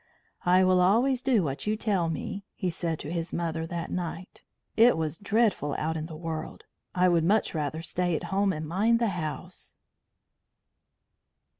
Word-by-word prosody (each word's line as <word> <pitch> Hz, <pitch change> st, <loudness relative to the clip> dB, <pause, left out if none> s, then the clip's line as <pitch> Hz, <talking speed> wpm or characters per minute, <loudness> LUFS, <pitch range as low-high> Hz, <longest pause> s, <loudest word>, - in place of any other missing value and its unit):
"I 185 Hz, +1 st, +6 dB
will 185 Hz, 0 st, +4 dB
always 240 Hz, +8 st, +3 dB
do 255 Hz, -7 st, +3 dB
what 140 Hz, +3 st, -3 dB
you 215 Hz, -, +2 dB
tell 195 Hz, -7 st, +1 dB
me," 195 Hz, +4 st, -4 dB
he 185 Hz, -3 st, -2 dB
said 165 Hz, -1 st, -2 dB
to 145 Hz, -, -6 dB
his 170 Hz, -1 st, -3 dB
mother 165 Hz, -1 st, -2 dB
that 170 Hz, 0 st, -5 dB
night. 180 Hz, 0 st, -5 dB, 0.3 s
"It 230 Hz, -3 st, +6 dB
was 160 Hz, -1 st, -2 dB
dreadful 210 Hz, -8 st, +1 dB
out 160 Hz, +1 st, -1 dB
in 160 Hz, 0 st, -4 dB
the 160 Hz, -, -8 dB
world. 160 Hz, -1 st, -5 dB, 0.3 s
I 180 Hz, 0 st, +4 dB
would 170 Hz, -2 st, +3 dB
much 205 Hz, +6 st, +2 dB
rather 155 Hz, 0 st, -3 dB
stay 175 Hz, 0 st, -1 dB
at -, -, -3 dB
home 200 Hz, 0 st, +2 dB
and 155 Hz, -3 st, -4 dB
mind 210 Hz, +8 st, +2 dB
the 230 Hz, -1 st, +1 dB
house." 170 Hz, -, -6 dB
175 Hz, 170 wpm, -28 LUFS, 160-200 Hz, 0.3 s, I